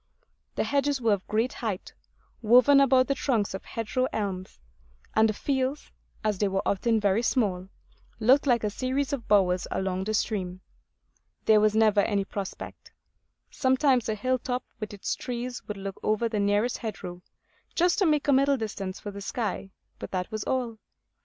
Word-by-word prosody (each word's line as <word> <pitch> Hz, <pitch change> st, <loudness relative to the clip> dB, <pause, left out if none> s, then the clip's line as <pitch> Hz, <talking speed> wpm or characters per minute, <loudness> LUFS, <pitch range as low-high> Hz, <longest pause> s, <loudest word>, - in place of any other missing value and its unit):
The -, -, +1 dB
hedges 285 Hz, -1 st, +1 dB
were 230 Hz, -3 st, +3 dB
of 195 Hz, -2 st, -3 dB
great 225 Hz, +4 st, 0 dB
height, 210 Hz, -6 st, -4 dB, 0.5 s
woven 250 Hz, +5 st, +6 dB
about 260 Hz, -1 st, +5 dB
the 275 Hz, -, +1 dB
trunks 235 Hz, -8 st, 0 dB
of 190 Hz, -, -6 dB
hedgerow 230 Hz, +3 st, -2 dB
elms; 195 Hz, -3 st, -4 dB, 0.5 s
and 220 Hz, 0 st, +4 dB
the -, -, 0 dB
fields, 265 Hz, +4 st, -2 dB, 0.3 s
as 210 Hz, -3 st, 0 dB
they 205 Hz, -, +2 dB
were 195 Hz, 0 st, -1 dB
often 225 Hz, +3 st, +1 dB
very 205 Hz, +1 st, +2 dB
small, 195 Hz, -7 st, 0 dB, 0.5 s
looked 260 Hz, +6 st, +4 dB
like 240 Hz, -3 st, +3 dB
a 210 Hz, -, 0 dB
series 265 Hz, +5 st, -1 dB
of 245 Hz, -5 st, -4 dB
bowers 185 Hz, -3 st, +3 dB
along 190 Hz, 0 st, -2 dB
the 215 Hz, +1 st, -1 dB
stream. 185 Hz, -4 st, -2 dB, 0.8 s
There 215 Hz, -1 st, +5 dB
was 215 Hz, 0 st, +3 dB
never 215 Hz, -2 st, +4 dB
any 200 Hz, -1 st, +1 dB
prospect; 200 Hz, -1 st, -7 dB, 0.6 s
sometimes 260 Hz, -2 st, +2 dB
a 215 Hz, -, 0 dB
hill 255 Hz, +4 st, 0 dB
top 250 Hz, 0 st, -3 dB, 0.2 s
with 215 Hz, -2 st, -5 dB
its 200 Hz, -2 st, -3 dB
trees 245 Hz, 0 st, -5 dB
would 210 Hz, -, -5 dB
look 195 Hz, 0 st, -6 dB
over 215 Hz, +2 st, +1 dB
the 220 Hz, -2 st, -2 dB
nearest 205 Hz, +4 st, +1 dB
hedgerow, 180 Hz, -5 st, -6 dB, 0.5 s
just 355 Hz, +2 st, +3 dB
to 385 Hz, -, +3 dB
make 300 Hz, -2 st, +1 dB
a 285 Hz, -, +5 dB
middle 275 Hz, +1 st, +4 dB
distance 200 Hz, -4 st, -5 dB
for 205 Hz, -, -6 dB
the 200 Hz, 0 st, -8 dB
sky; 200 Hz, -2 st, -3 dB, 0.3 s
but -, -, -6 dB
that 185 Hz, +2 st, -3 dB
was 215 Hz, -1 st, -3 dB
all. 240 Hz, -4 st, -2 dB
220 Hz, 175 wpm, -27 LUFS, 200-255 Hz, 0.8 s, woven